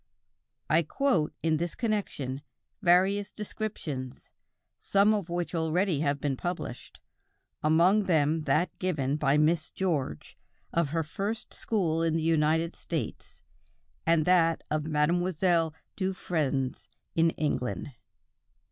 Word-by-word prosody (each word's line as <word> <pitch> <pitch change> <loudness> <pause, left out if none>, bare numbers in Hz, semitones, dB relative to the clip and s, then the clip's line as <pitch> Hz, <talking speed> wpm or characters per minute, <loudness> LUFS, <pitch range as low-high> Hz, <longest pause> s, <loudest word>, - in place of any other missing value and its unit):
I 155 +3 +4
quote, 170 - +1
in 160 -1 +2
this 170 +1 -3
connection, 190 - -2 0.4
various 195 +2 +3
descriptions, 170 - -5 0.5
some 200 +2 +3
of 200 -5 -2
which 175 +1 -2
already 165 0 +1
have 145 -1 0
been 140 -1 -1
published, 170 -6 -5 0.6
among 175 +7 +4
them 155 -2 +2
that 180 - +1
given 150 -7 0
by 145 -1 +2
Miss 155 +1 +2
George, 150 - -3 0.3
of 170 -4 +1
her 165 +2 0
first 205 +9 -4
school 170 -7 0
in 165 -1 +1
the 165 - 0
United 160 +1 +2
States, - - -5 0.6
and 165 -2 +3
that 165 -3 +3
of 155 -1 0
Mlle. 165 +1 +1 0.2
Dufresne 155 -9 -1 0.4
in 165 0 +4
England. 145 -2 -2
165 Hz, 115 wpm, -29 LUFS, 150-185 Hz, 0.6 s, I